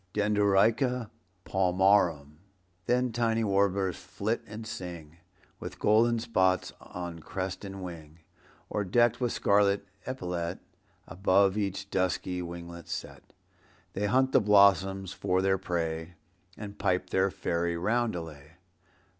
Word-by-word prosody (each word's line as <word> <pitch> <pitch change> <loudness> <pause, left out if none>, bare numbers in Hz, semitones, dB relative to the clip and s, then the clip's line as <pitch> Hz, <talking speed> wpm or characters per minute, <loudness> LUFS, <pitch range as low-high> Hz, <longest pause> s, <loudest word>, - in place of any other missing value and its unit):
(Dendroica 105 +4 +2 0.3
palmarum.) 90 -5 +2 0.5
Then 125 0 +2
tiny 115 -1 +1
warblers 100 -2 +1
flit 110 +3 -3
and 110 +2 -8
sing, 85 -6 -8 0.4
With - - -7
golden 115 +3 +3
spots 95 -5 +1
on 85 -2 -7
crest 95 +4 -5
and 95 -1 -7
wing, 85 -2 -9 0.5
Or, 105 - -2
decked 120 +6 +2
with 120 -2 +1
scarlet 100 0 +2 0.2
epaulette 90 -9 -3 0.5
Above 95 +1 +2
each 100 -1 -3
dusky 90 -1 -1
winglet 85 -1 -8
set, - - -7 0.6
They 105 +2 -1
hunt 130 +5 +2
the - - +5
blossoms 95 -2 +4
for 90 - 0
their 95 0 +2
prey 85 -2 -3 0.4
And 105 -1 -8
pipe 90 0 0
their 95 +1 +2
fairy 85 -1 -2
roundelay. 85 -8 -2
95 Hz, 115 wpm, -29 LUFS, 90-105 Hz, 0.6 s, the